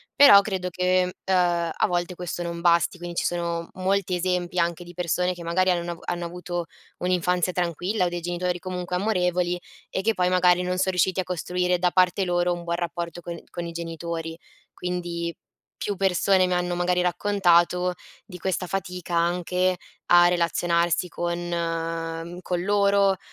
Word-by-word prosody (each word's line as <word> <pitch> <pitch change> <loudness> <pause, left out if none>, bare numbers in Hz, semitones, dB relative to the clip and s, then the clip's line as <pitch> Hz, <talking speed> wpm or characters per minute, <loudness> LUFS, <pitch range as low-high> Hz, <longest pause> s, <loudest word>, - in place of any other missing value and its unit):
però 205 -8 +9
credo 190 -3 -3
che, 180 +1 +1
ehm, 175 -3 +2
a - - +1
volte 175 0 -2
questo 175 0 -4
non 170 0 -5
basti. 170 +1 +3
Quindi 175 0 -7
ci - - 0
sono 170 -1 -2
molti 190 0 0
esempi 180 0 -1
anche 170 0 0
di 175 0 -12
persone 180 +1 0
che 175 -1 -10
magari 185 +3 +1
hanno 175 0 -1
avu 170 - -8
hanno 175 0 -3
avuto 175 0 -4 0.3
un'infanzia 180 0 +1
tranquilla 180 +3 0
o - - 0
dei 175 0 -4
genitori 175 +1 -2
comunque 180 -1 -4
amorevoli 180 -3 0 0.3
e 190 - -2
che 225 +2 +2
poi 180 -2 +1
magari 180 -1 +4
non 180 0 -1
son 190 0 +2
riusciti 185 +1 +1
a - - +1
costruire 180 0 -1
da 180 -1 +2
parte 185 +1 +3
loro 175 0 +1
un 175 0 -6
buon 170 0 -1
rapporto 170 0 -4
con 170 0 -6
con 175 - -5
i 170 - -5
genitori. 165 -1 -5 0.4
Quindi 175 -1 -3 0.4
più 205 -2 -3
persone 190 0 +3
mi 180 - 0
hanno 180 0 0
magari 180 0 +1
raccontato 180 -1 +2 0.3
di 180 - -10
questa 185 0 -1
fatica 180 -2 -4
anche 180 +2 +1 0.3
a 175 0 +7
relazionarsi 170 0 +1
con 170 0 -2
ehm, 165 0 -3
con 175 -1 -2
loro, 200 -1 +3
180 Hz, 170 wpm, -25 LUFS, 170-180 Hz, 0.4 s, però